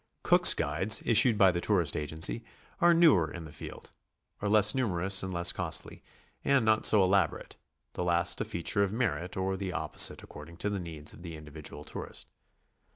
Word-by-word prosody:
Cook's -, -, +6 dB
guides, 85 Hz, +9 st, 0 dB
issued 115 Hz, 0 st, +5 dB
by 95 Hz, -3 st, +4 dB
the 85 Hz, -1 st, -5 dB
tourist 90 Hz, -6 st, -1 dB
agency, 75 Hz, -4 st, +1 dB, 0.4 s
are 175 Hz, 0 st, +3 dB
newer 155 Hz, -, +2 dB
in 85 Hz, -, -9 dB
the 80 Hz, -, -12 dB
field, 75 Hz, -, -12 dB, 0.5 s
are 100 Hz, -, -4 dB
less 105 Hz, 0 st, +3 dB
numerous 100 Hz, -6 st, 0 dB
and 95 Hz, -, -6 dB
less 85 Hz, -1 st, +1 dB
costly, -, -, -4 dB, 0.4 s
and 140 Hz, -4 st, 0 dB
not 110 Hz, 0 st, +3 dB
so 105 Hz, -, +4 dB
elab 95 Hz, -2 st, +1 dB
orate, -, -, -13 dB, 0.4 s
the -, -, -5 dB
last 85 Hz, -1 st, 0 dB
a -, -, 0 dB
feature 85 Hz, +4 st, -3 dB
of 100 Hz, -1 st, -1 dB
merit 110 Hz, -6 st, -4 dB
or 95 Hz, 0 st, -3 dB
the 95 Hz, -1 st, -6 dB
opposite -, -, +1 dB
according 80 Hz, +3 st, -14 dB
to 105 Hz, -, -4 dB
the 100 Hz, -, -4 dB
needs 80 Hz, -3 st, -5 dB
of -, -, -16 dB
the 85 Hz, -2 st, -9 dB
individual 75 Hz, 0 st, -12 dB
tourist. -, -, -9 dB
95 Hz, 185 wpm, -28 LUFS, 85-105 Hz, 0.5 s, Cook's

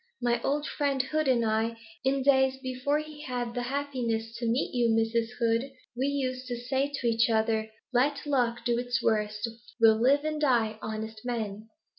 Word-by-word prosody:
My 240 Hz, -1 st, +1 dB
old 290 Hz, +3 st, 0 dB
friend 280 Hz, -1 st, -1 dB
Hood 310 Hz, +2 st, -1 dB
and 240 Hz, -3 st, +3 dB
I, 225 Hz, +1 st, 0 dB, 0.3 s
in 265 Hz, 0 st, +1 dB
days 265 Hz, -1 st, +4 dB
even 265 Hz, -, -20 dB
before 260 Hz, +3 st, 0 dB
he 305 Hz, -1 st, -7 dB
had 245 Hz, -4 st, -3 dB
the 245 Hz, -, -2 dB
happiness 240 Hz, -4 st, -2 dB
to 235 Hz, -1 st, -1 dB
meet 240 Hz, +4 st, 0 dB
you, 240 Hz, -2 st, +2 dB
Mrs. 225 Hz, +1 st, +1 dB
Hood, 235 Hz, +3 st, +1 dB, 0.2 s
we 260 Hz, +3 st, 0 dB
used 260 Hz, -2 st, -2 dB
to 245 Hz, -, -2 dB
say 265 Hz, +4 st, -1 dB
to 275 Hz, -4 st, -2 dB
each 230 Hz, 0 st, +3 dB
other 220 Hz, -1 st, +1 dB, 0.2 s
Let 280 Hz, +4 st, +2 dB
luck 240 Hz, -5 st, 0 dB
do 240 Hz, -1 st, +2 dB
its 245 Hz, 0 st, -1 dB
worst, 210 Hz, 0 st, 0 dB, 0.3 s
we'll 225 Hz, -1 st, +6 dB
live 280 Hz, +4 st, +4 dB
and 305 Hz, -1 st, -2 dB
die 230 Hz, -6 st, +2 dB
honest 220 Hz, 0 st, -5 dB
men. 220 Hz, -3 st, -4 dB
245 Hz, 185 wpm, -28 LUFS, 225-270 Hz, 0.3 s, we'll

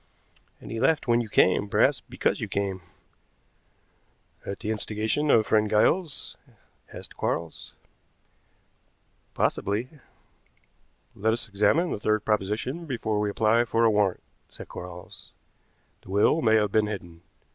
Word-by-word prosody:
"And -, -, -10 dB
he 115 Hz, -, -3 dB
left 140 Hz, +4 st, +2 dB
when 120 Hz, 0 st, +3 dB
you 115 Hz, -, -6 dB
came, 100 Hz, +1 st, +3 dB
perhaps -, -, +2 dB
because -, -, -1 dB
you -, -, -2 dB
came." 100 Hz, -2 st, -2 dB, 1.6 s
"At 100 Hz, -, -6 dB
the 110 Hz, -1 st, -2 dB
instigation 110 Hz, +7 st, -1 dB
of 110 Hz, -5 st, +5 dB
friend 105 Hz, -1 st, +2 dB
Giles?" 150 Hz, -, +1 dB, 0.6 s
asked -, -, -10 dB
Quarles. 85 Hz, -1 st, -4 dB, 1.6 s
"Possibly." 105 Hz, +6 st, -1 dB, 1.2 s
"Let 110 Hz, +3 st, 0 dB
us 115 Hz, 0 st, -3 dB
examine 105 Hz, -, +2 dB
the -, -, -3 dB
third 110 Hz, 0 st, 0 dB
proposition 110 Hz, -, -2 dB
before 110 Hz, -5 st, -2 dB
we 105 Hz, 0 st, 0 dB
apply 110 Hz, +3 st, +2 dB
for 115 Hz, 0 st, +1 dB
a 110 Hz, -, +5 dB
warrant," 105 Hz, -3 st, +1 dB, 0.3 s
said -, -, -11 dB
Quarles. 90 Hz, 0 st, -10 dB, 0.7 s
"The -, -, -17 dB
will 105 Hz, +11 st, +3 dB
may 110 Hz, -4 st, +4 dB
have 105 Hz, -2 st, +2 dB
been 110 Hz, 0 st, +2 dB
hidden. 85 Hz, -5 st, -7 dB
110 Hz, 135 wpm, -26 LUFS, 100-115 Hz, 1.6 s, of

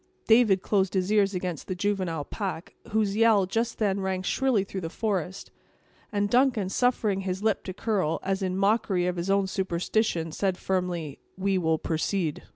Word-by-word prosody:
David 220 Hz, -5 st, +4 dB
closed 195 Hz, -2 st, +1 dB
his 185 Hz, +1 st, 0 dB
ears 200 Hz, -2 st, +3 dB
against 180 Hz, -4 st, -4 dB
the 185 Hz, -, -3 dB
juvenile 185 Hz, -5 st, -1 dB
pack, 185 Hz, -3 st, -5 dB, 0.2 s
whose 210 Hz, -2 st, +1 dB
yell 220 Hz, -3 st, +4 dB
just 225 Hz, +5 st, -2 dB
then 200 Hz, -3 st, +1 dB
rang 190 Hz, -1 st, -2 dB
shrilly 245 Hz, 0 st, +1 dB
through 195 Hz, -1 st, -6 dB
the 165 Hz, -, -4 dB
forest; 190 Hz, -2 st, -3 dB, 0.6 s
and 205 Hz, -1 st, +1 dB
Duncan, 240 Hz, -4 st, +2 dB
suffering 215 Hz, -4 st, +1 dB
his 190 Hz, +1 st, -3 dB
lip 220 Hz, -2 st, +1 dB
to 185 Hz, -, -4 dB
curl, 195 Hz, -8 st, 0 dB
as 195 Hz, +1 st, -1 dB
in 185 Hz, -1 st, -1 dB
mockery 195 Hz, -2 st, +2 dB
of 180 Hz, 0 st, -1 dB
his 170 Hz, +3 st, -3 dB
own 195 Hz, 0 st, +3 dB
superstition, 185 Hz, -2 st, -1 dB
said 190 Hz, +2 st, -1 dB
firmly: 175 Hz, -6 st, -2 dB, 0.2 s
"We 190 Hz, 0 st, +1 dB
will 160 Hz, -2 st, +1 dB
proceed." 160 Hz, 0 st, -1 dB
195 Hz, 170 wpm, -27 LUFS, 180-210 Hz, 0.6 s, David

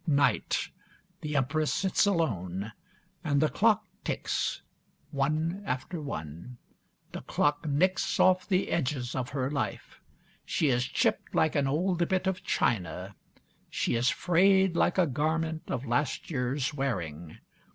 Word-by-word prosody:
Night. 140 Hz, -2 st, +2 dB, 0.5 s
The 150 Hz, -1 st, -4 dB
Empress 145 Hz, +3 st, +1 dB
sits 195 Hz, +1 st, +2 dB
alone, 105 Hz, -, -1 dB, 0.5 s
and 145 Hz, -4 st, +2 dB
the 155 Hz, +1 st, +3 dB
clock 220 Hz, 0 st, +3 dB, 0.2 s
ticks, -, -, -2 dB, 0.5 s
one 155 Hz, +6 st, 0 dB
after 155 Hz, +3 st, -3 dB
one. 85 Hz, -, -7 dB, 0.5 s
The -, -, -6 dB
clock 145 Hz, +2 st, 0 dB
nicks 180 Hz, +6 st, +1 dB
off 185 Hz, 0 st, +4 dB
the 190 Hz, -1 st, +1 dB
edges 130 Hz, -5 st, -1 dB
of 130 Hz, -1 st, -3 dB
her 135 Hz, 0 st, -2 dB
life. 145 Hz, -, -4 dB, 0.4 s
She 155 Hz, -, +1 dB
is 125 Hz, -1 st, +2 dB
chipped -, -, 0 dB
like 160 Hz, -1 st, +2 dB
an 140 Hz, -2 st, +2 dB
old 170 Hz, +4 st, +1 dB
bit 185 Hz, 0 st, +1 dB
of 190 Hz, -1 st, -1 dB
china; 95 Hz, -, -1 dB, 0.6 s
she -, -, -1 dB
is 120 Hz, +2 st, +2 dB
frayed 190 Hz, +1 st, +3 dB
like 175 Hz, -, +2 dB
a 185 Hz, -, +5 dB
garment 160 Hz, +3 st, -1 dB
of 135 Hz, 0 st, -2 dB
last 135 Hz, +7 st, -1 dB
year's 135 Hz, +1 st, -1 dB
wearing. 85 Hz, -, -3 dB
145 Hz, 135 wpm, -29 LUFS, 125-170 Hz, 0.6 s, a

